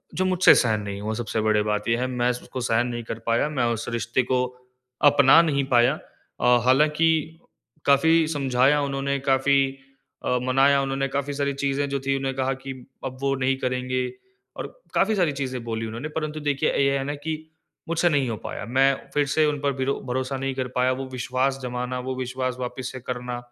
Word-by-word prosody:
जो 185 - +1
मुझसे 185 -1 +6
सहन 110 -3 +2
नहीं 100 -1 -5
हुआ। 110 +1 -2
सबसे 110 -1 -2
बड़ी 105 -1 +2
बात 105 0 -1
ये 115 - +3
है 125 +1 -1
मैं 125 -1 0
उसको 125 +1 -6
सहन 120 +1 +1
नहीं 120 -1 -4
कर 115 0 -6
पाया, 115 +5 +2
मैं 150 -5 -1
उस 115 0 -5
रिश्ते 120 +2 0
को 125 +1 +1 0.7
अपना 140 +3 +7
नहीं 145 -4 +1
पाया। 120 +3 +5 0.5
अ, 120 0 +5
हालाँकि 155 +4 +2 0.5
काफ़ी 160 +3 +4
समझाया 140 -1 +2
उन्होंने 140 0 -1
काफ़ी 135 +1 +4 0.7
अ, 125 - +2
मनाया 135 +2 +4
उन्होंने 135 0 -1
काफ़ी 140 +1 -2
सारी 140 0 -1
चीज़ें 140 +1 -1
जो 140 0 -1
थी। 135 - +2
उन्होंने 135 0 -2
कहा 130 0 0
कि 135 - -5 0.3
अब 130 0 -5
वो 140 0 +1
नहीं 135 +1 +2
करेंगे 130 0 -1 0.5
और - - -4 0.3
काफ़ी 215 +2 +2
सारी 175 -6 +2
चीज़ें 130 -3 -4
बोली 115 -1 -3
उन्होंने, 115 +7 -5
परंतु 155 0 -4
देखिए 145 0 0
ये 140 0 +2
है 135 - -2
ना 145 +1 -3
कि 155 +2 -3 0.5
मुझसे 170 +1 +2
नहीं 140 -5 +1
हो 115 - -2
पाया। - - -5
मैं 135 +4 +3 0.2
फ़िर 145 0 +2
से 155 +3 +2
उन 150 -1 0
पर 140 -1 +1
ब्रो 135 +1 -1
भरोसा 130 +1 -2
नहीं 135 0 -2
कर 130 -1 -2
पाया। 125 +1 +3
वो 130 +1 -3
विश्वास 130 +2 -1
जमाना, 125 0 -3
वो 130 +1 -4
विश्वास 130 0 -3
वापिस 125 0 -4
से 130 - -7
करना। 125 0 -5
135 Hz, 200 wpm, -24 LUFS, 125-140 Hz, 0.7 s, अपना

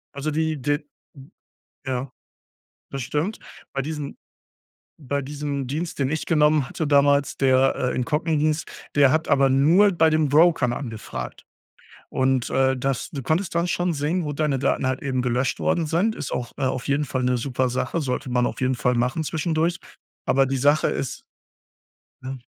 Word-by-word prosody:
Also 140 +2 -2
die 160 0 0
d 145 +3 +1 1.1
ja. 130 0 -2 0.8
Das 135 - -4
stimmt. 150 - -2 0.3
Bei 135 - -1
diesen 150 0 -5 0.8
bei 140 -1 -2
diesem 140 -1 -4
Dienst, 155 +6 -4
den 135 -1 +1
ich 155 +1 -2
genommen 150 -4 +3
hatte 160 - -3
damals, 140 0 +3
der, 135 0 +3
äh, 125 -1 -1
"Incogni" 155 +5 0
hieß, 155 +1 +1 0.3
der 140 -2 +6
hat 160 +2 +1
aber 135 0 +4
nur 165 +10 +5
bei 165 -3 +3
den 155 -1 +2
Brokern 150 -4 +4
angefragt. 115 -5 -6 0.6
Und, 130 -1 +1
äh, 130 0 +2
das 135 0 -2
du 140 - -5
konntest 170 +7 0
dann 170 +1 +1
schon 175 0 0
sehen, 155 +4 -1
wo 145 - -3
deine 145 -2 0
Daten 130 - 0
halt 130 0 -1
eben 130 -2 -1
gelöscht 125 +1 0
worden 170 - +1
sind. 175 +8 +1
Ist - - -5
auch, 120 -1 -3
äh, - - -3
auf 130 -1 -1
jeden 145 +2 +1
Fall 130 0 -2
'ne 125 0 +2
super 130 +1 -1
Sache. 125 +5 -2
Sollte 130 0 -3
man 125 0 +2
auf - - -4
jeden 130 0 +1
Fall 125 +1 +1
machen 125 +6 0
zwischendurch. 160 +2 0 0.5
Aber, 135 +1 +3
die 135 0 -1
Sache 145 +4 +3
ist 135 - -3 1.0
ja? 130 +1 -5
140 Hz, 175 wpm, -23 LUFS, 130-155 Hz, 1.1 s, der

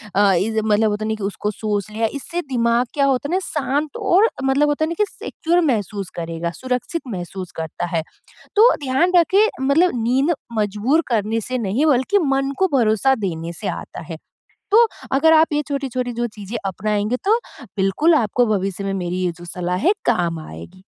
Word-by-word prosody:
अ, 200 -1 +5
इस 220 +5 +1
मतलब 215 0 +3
होता 210 +1 -2
है 220 - -2
ना, 220 - 0
कि 215 - -8
उसको 205 +1 -2
सोच 210 -1 -3
लिया 225 +1 0
इससे 340 +5 -4
दिमाग 235 0 +1
क्या 280 - +3
होता 275 +1 0
है 345 - -2
ना - - +2
शांत 290 0 -2
और 405 +6 +4
मतलब 270 +2 +3
होता 295 +2 +1
है - - -4
ना 335 - -3
कि 420 - +4
सिक्योर 345 +1 -1
महसूस 200 -3 -3
करेगा 170 0 -4
सुरक्षित 255 +6 -2
महसूस 185 -3 -6
करता 160 +2 -4
है। 160 - +1 0.5
तो 460 +4 +7
ध्यान 270 +8 +2
रखें 380 +5 +5 0.2
मतलब 315 +7 +3
नींद 265 +8 +2 0.3
मजबूर 215 +10 +1
करने 225 -1 0
से 255 +3 -3
नहीं 230 +8 0
बल्कि 290 +8 +3
मन 270 0 +1
को 380 - +3
भरोसा 230 +3 +3
देने 165 -1 -4
से 205 - -3
आता 175 - -6
है, 165 - -4 0.6
तो 465 +2 +7 0.3
अगर 320 +4 +4
आप 315 0 +5
ये 295 0 +1
छोटी-छोटी 255 -3 -2
जो 240 +1 -1
चीज़ें 210 +3 -6
अपनाएँगे 210 +4 -1
तो 435 +4 +4 0.4
बिल्कुल 195 - +3
आपको 245 -2 +2
भविष्य 195 0 -3
में 195 - -1
मेरी 180 -2 -3
ये 175 - 0
जो 175 - -10
सलाह 180 +1 -3
है 385 - +6
काम 175 -8 +1
आएगी। 85 - -11
235 Hz, 190 wpm, -20 LUFS, 195-290 Hz, 0.6 s, तो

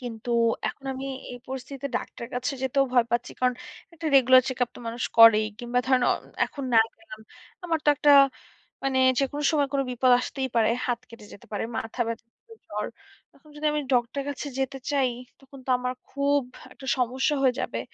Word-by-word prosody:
কিন্তু 240 -1 -6 0.4
এখন 270 - -9
আমি 265 +1 -6 0.3
এই 245 - -8
পরিস্থিতিতে 265 +1 -6
ডাক্তারের 235 0 -7
কাছে 250 +2 -2
যেতেও 275 +1 +2
ভয় 240 -2 +4
পাচ্ছি। 240 +1 -1
কারণ 250 -1 +2 0.4
একটা 330 -1 -6
রেগুলার 255 0 +7
চেক 260 - -4
আপ - - -22
তো - - -10
মানুষ 235 +2 -4
করেই 220 -1 +8
কিংবা 245 0 -1
ধরেন 260 -2 +3
অ - - +5 0.3
এখন 280 -2 -7
না - - +8 0.2
গেলাম। 265 -11 -12 0.4
আমার 330 -2 0
তো - - +2
একটা 290 0 +5 0.7
মানে 265 -1 +1 0.2
যেকোনো 285 +2 -1
সময় 290 -3 +2
কোন 275 - +2
বিপদ 250 +1 +2
আসতেই 265 +1 -3
পারে, 225 -1 +4 0.2
হাত 240 -1 0
কেটে 230 -2 -13
যেতে - - -15
পারে। 205 - -2
মাথা 225 +2 -4
ব্যাথা 230 0 -5 0.4
জ্বর। - - -3 0.5
এখন 305 - -21
যদি 300 +1 -5
আমি 300 - 0
ডক্টর 240 +2 +1
এর - - -8
কাছে 285 +1 -5
যেতে 270 0 -2
চাই 265 -3 +2 0.3
তখন 270 0 -14
তো - - -7
আমার 250 0 -3 0.2
খুব 280 +1 +1 0.3
একটা 265 - -12
সমস্যা 260 +4 +1
হয়ে 255 - +4
যাবে। - - -3
260 Hz, 190 wpm, -26 LUFS, 240-275 Hz, 0.7 s, করেই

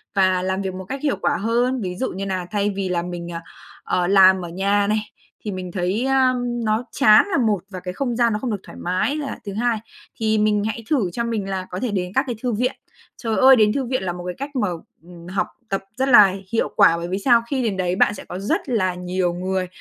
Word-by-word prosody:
và 185 -2 +3
làm 190 +1 -1
việc 190 -1 -3
một 190 0 -7
cách 270 +6 -5
hiệu 290 -2 +1
quả - - +1
hơn 240 +4 0
ví 180 -3 -4
dụ 260 - -2
như 195 +2 -5
nà 185 -2 -2
thay 205 -1 +1
vì 195 -1 -2
là 175 -1 0
mình, 175 0 -6
à, 165 0 -5 0.4
ờ, 180 -1 0
làm 190 -1 +5
ở 170 - -7
nhà 200 +3 +1
này, 215 +1 +1 0.5
thì 210 - -2
mình 185 -2 -6
thấy, 185 +6 -1
a, 265 -1 +3
ưm, 240 -2 -2
nó 215 +2 +1
chán 215 -1 +6
là 340 - +2
một 220 -6 +2
và 185 -2 -7
cái 180 0 -6
không 245 +2 -2
gian 235 -1 +2
nó 210 - -1
không 245 +1 -3
được 205 - -2
thoải - - -12
mái 185 +11 0
là 295 -2 -4
thứ 200 - -5
hai, 235 +2 0 0.4
thì 220 -1 +1
mình 210 -1 +2
hãy 220 +1 -4
thử 225 - +1
cho 235 - -2
mình 215 -4 -2
là 190 -1 -3
có 180 - -5
thể 240 +1 -2
đến 180 -2 -2
các 265 - +3
cái 245 - -2
thư 245 -2 0
viện. 250 +5 0 0.5
Trời 225 -3 -2
ơi, 265 0 +8
đến 215 -2 +4
thư 270 -2 -1
viện 255 -3 -2
là 180 -2 -2
một 175 0 -8
cái 180 - -4
cách 280 +2 -6
mà, 225 -5 +1 0.4
ừm, 170 0 -13
học 190 +2 -1 0.2
tập 195 - -1 0.2
rất 265 +1 +1
là 205 -7 +8 0.2
hiệu 230 - 0
quả 200 -5 +5
bởi 170 0 -4
vì 185 +2 -2
sao? 235 +2 +4
Khi 265 -2 0
đến 210 -5 -1
đấy 180 -1 0
bạn 205 - +3
sẽ 205 - -9
có 180 - -6
rất 200 +7 -2
là 190 -7 +1
nhiều 180 0 -1
người 185 +1 -2
205 Hz, 265 wpm, -22 LUFS, 185-235 Hz, 0.5 s, ơi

